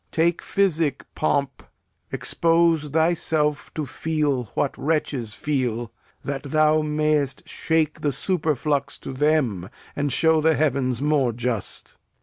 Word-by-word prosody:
Take 170 +1 +1
physic, 165 -8 0
pomp; 140 -4 -1 0.5
Expose 165 -2 +2
thyself 160 -1 +1
to 155 - -2
feel 145 -2 -1
what 140 - 0
wretches 140 -7 -1
feel, 120 -6 -2 0.3
That 140 0 -3
thou 155 +2 +3
mayst 150 -3 0
shake 160 -2 -1
the 145 - +1
superflux 150 -3 -1
to - - -6
them 130 - +1 0.3
And 145 -1 -1
show 160 +4 +3
the 160 0 +3
heavens 135 -3 0
more 145 -5 +2
just. 115 -2 -4
150 Hz, 120 wpm, -23 LUFS, 135-155 Hz, 0.5 s, thou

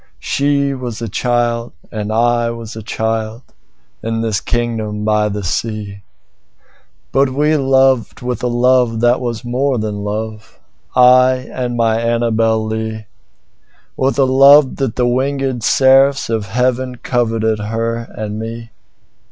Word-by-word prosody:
I 140 0 +1
was 125 -4 -6
a 115 - -4
child 120 +1 -1 0.2
and 105 -2 -4
she - - -2 0.4
was 115 -1 -9
a 110 - -7
child, 110 +2 -3 0.6
In 115 0 -2
this 110 -2 -1
kingdom 110 -3 -2
by 105 0 +2
the 105 0 -4
sea, 100 +2 -4 1.1
But 135 0 +2
we 150 +4 +1
loved 135 -4 +2
with 125 -2 -3
a 125 - 0
love 120 -1 +2
that 120 +1 +3
was 120 -1 -4
more 130 +2 0
than 105 -2 -3
love,I 125 +4 +1
and 125 -2 -3
my 115 -1 +1
Annabel 115 -1 +1
Lee; 110 0 -4 0.9
With 135 +1 0
a 140 - +4
love 135 +1 +6
that 135 -5 -2
the 125 - +1
wingèd 130 0 -1
seraphs 135 +2 +3
of 110 -3 -2
heavenCoveted 120 -2 -1
her 115 +1 -1 0.2
and 105 0 -4
me. 115 +1 -7
120 Hz, 130 wpm, -16 LUFS, 110-130 Hz, 1.1 s, love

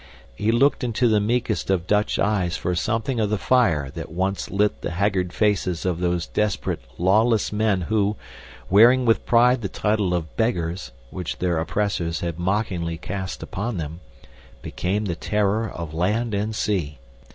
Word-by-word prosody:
He 105 +2 0
looked 135 +5 +3
into 120 0 +1
the 110 -2 +3
meekest 115 0 -1
of 90 -3 +1
Dutch 105 +2 +1
eyes 100 -4 0
for 90 - -2
something 115 +7 -1
of 105 -2 +1
the 105 - 0
fire 85 - +2
that - - -7
once 95 +3 -2
lit 105 +1 0
the - - -3
haggard 90 0 0
faces 95 -5 0
of 90 -2 0
those 90 -2 0
desperate, 105 -10 -1 0.2
lawless 105 +5 +2
men 105 -3 +1
who, 105 +2 0 0.5
wearing 120 +6 +6
with 115 -1 +2
pride 120 +1 +4
the 100 - -3
title 105 -4 0
of 80 -3 -4
"Beggars," 90 - -1 0.2
which 90 -2 -5
their 90 -3 0
oppressors 85 -2 -1
had 85 -1 -3
mockingly 90 -3 -1
cast 95 +3 -5
upon 100 +2 -4
them, 80 +1 -5 0.6
became 100 +4 -2
the 90 - -1
terror 105 +3 0
of 85 -2 -7
land 105 +7 0
and 105 +2 -1
sea. 85 -10 -1
100 Hz, 165 wpm, -23 LUFS, 90-110 Hz, 0.6 s, wearing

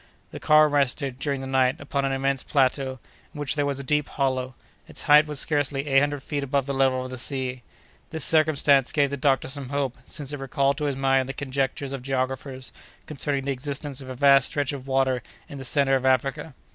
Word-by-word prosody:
The - - -7
car 155 0 +5
rested, 140 -2 0
during 140 -2 -2
the - - -6
night, 130 -1 +1
upon 140 -1 -2
an 135 - 0
immense 135 0 0
plateau, 135 -1 0 0.4
in - - -7
which 145 -2 -2
there 145 -2 0
was 140 -1 -2
a - - -4
deep 150 +1 0
hollow; 130 -2 -1 0.3
its - - -8
height 150 +1 +6
was 150 -2 0
scarcely 145 -2 0
eight 135 -2 +4
hundred 145 -1 -1
feet 145 -1 -3
above 140 0 0
the 140 - -3
level 130 -1 +1
of 130 - -8
the 130 - -6
sea. 130 -1 -3 0.5
This 160 - -3
circumstance 150 -4 +3
gave 145 -3 +1
the - - -1
doctor 135 0 +1
some 135 -1 -4
hope, 140 -2 -2
since 145 -1 -5
it 145 - -5
recalled 135 +1 0
to 150 - -1
his 140 -2 -1
mind 135 -1 +1
the - - -3
conjectures 135 0 -2
of 135 - -5
geographers 130 0 -4 0.3
concerning 140 -2 -2
the 140 - 0
existence 140 +1 -4
of 130 - -10
a 130 - -6
vast 140 +1 +5
stretch 145 -1 -2
of 135 -1 -8
water 130 -2 +1 0.3
in 140 - -9
the - - -6
centre 135 +1 +2
of 130 - -1
Africa. 135 +3 0
135 Hz, 220 wpm, -25 LUFS, 130-145 Hz, 0.5 s, height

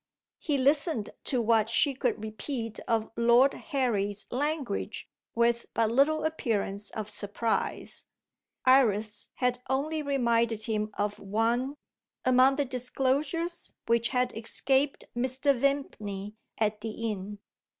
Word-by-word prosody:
He 295 -3 0
listened 280 - +2
to 250 -4 +1
what 225 -1 +3
she 275 +4 +3
could 245 -4 -1
repeat 225 +1 -5
of 225 -2 0
Lord 235 +4 +5
Harry's 210 -8 -1
language 285 -4 -2 0.3
with 235 0 +2
but 225 -1 +2
little 290 +5 +3
appearance 210 -10 -1
of 215 -2 -5
surprise. 215 +2 -2 0.6
Iris 215 -5 +3
had 250 -1 0
only 300 +4 0
reminded 235 -6 +1
him 215 -1 -1
of 205 0 -1
one, 230 +7 0 0.5
among 255 +1 +5
the 285 0 0
disclosures 275 +7 -1
which 235 0 +2
had 250 -1 0
escaped 265 +5 +1
Mr. 260 +3 +1
Vimpany 215 -7 -2 0.2
at 215 -1 0
the 225 +1 -3
inn. 205 +1 -6
235 Hz, 120 wpm, -29 LUFS, 215-275 Hz, 0.6 s, Lord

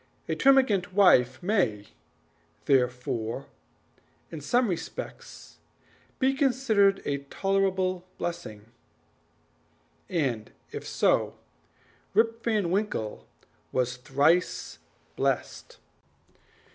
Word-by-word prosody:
A - - -1
termagant 255 -10 +3
wife 130 -9 +4
may, 145 - 0 0.8
therefore, 125 -2 0 0.9
in 160 - -7
some 245 - +2
respects 180 -4 -7 0.6
be 265 0 +2
considered 245 -8 +2
a 140 -1 -1
tolerable 185 +3 -1
blessing, 110 -11 -5 1.4
and 130 -11 -1 0.2
if - - -7
so, - - +1 0.8
Rip 225 +1 +2
Van 210 -7 0
Winkle 190 - -2 0.4
was 125 -1 -1
thrice 145 +7 +1 0.4
blessed. - - -2
180 Hz, 80 wpm, -27 LUFS, 130-210 Hz, 1.4 s, wife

